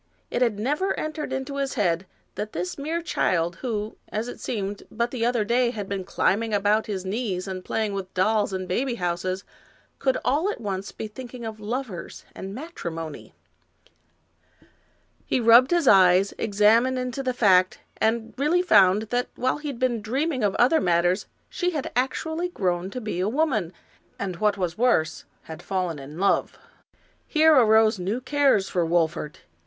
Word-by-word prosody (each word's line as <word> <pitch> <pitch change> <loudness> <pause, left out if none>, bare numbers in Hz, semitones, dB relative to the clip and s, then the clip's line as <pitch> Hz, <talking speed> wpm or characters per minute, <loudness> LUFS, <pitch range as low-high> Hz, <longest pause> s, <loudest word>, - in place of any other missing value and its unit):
It 240 - -1
had 230 -5 +2
never 295 - -1
entered 310 -2 -4
into 265 +1 -4
his 275 0 -2
head 185 -4 0 0.3
that 210 +1 -5
this 180 +2 -3
mere 320 +4 -3
child, 170 - 0
who, 215 -3 -4
as 220 +3 -3
it 245 - -8
seemed, 205 -3 -4
but 235 +1 -2
the 245 -3 -3
other 240 -2 +2
day 240 +3 +2
had 210 -5 -5
been 195 -1 -3
climbing 220 +4 +1
about 205 +2 +2
his 190 -3 -4
knees 195 -2 -2
and 185 -1 -5
playing 215 0 -1
with 190 -1 -5
dolls 205 +2 +2
and 185 -1 -4
baby 245 +7 -1
houses, 185 0 -2 0.6
could 265 -1 +1
all 305 +9 +2
at - - -7
once 195 -3 -4
be 220 - -6
thinking 245 +2 -9
of 220 -1 -6
lovers 215 -4 -5
and 195 +1 -7
matrimony. 170 - -7 1.9
He - - +1
rubbed 235 +2 +7
his 345 -5 +2
eyes, 190 0 +6
examined 225 +5 +3
into 250 +1 -3
the 260 -1 -1
fact, 190 -7 +4 0.2
and 225 0 0
really 330 +6 +2
found 200 - +5
that 245 0 0
while 255 +4 0
he 300 - -6
had 275 -4 -4
been 240 -3 0
dreaming 260 +4 -1
of 200 -2 +1
other 265 +7 +4
matters, 175 +2 +1 0.2
she 360 -1 -1
had 280 - -4
actually 320 +7 -1
grown 180 - -1
to 250 - -5
be 210 -6 -4
a 190 +3 +1
woman, 240 - 0 0.5
and, 185 -3 -4
what 210 0 +1
was 180 0 -3
worse, 235 -11 +1 0.2
had 160 +1 -9
fallen 180 -6 -2
in 140 +3 -10
love. 195 +2 +1 0.7
Here 315 0 +5
arose 220 -5 +5
new 195 +7 -2
cares 270 -7 +2
for 175 - 0
Wolfert. 160 -2 -1
215 Hz, 170 wpm, -25 LUFS, 190-255 Hz, 1.9 s, rubbed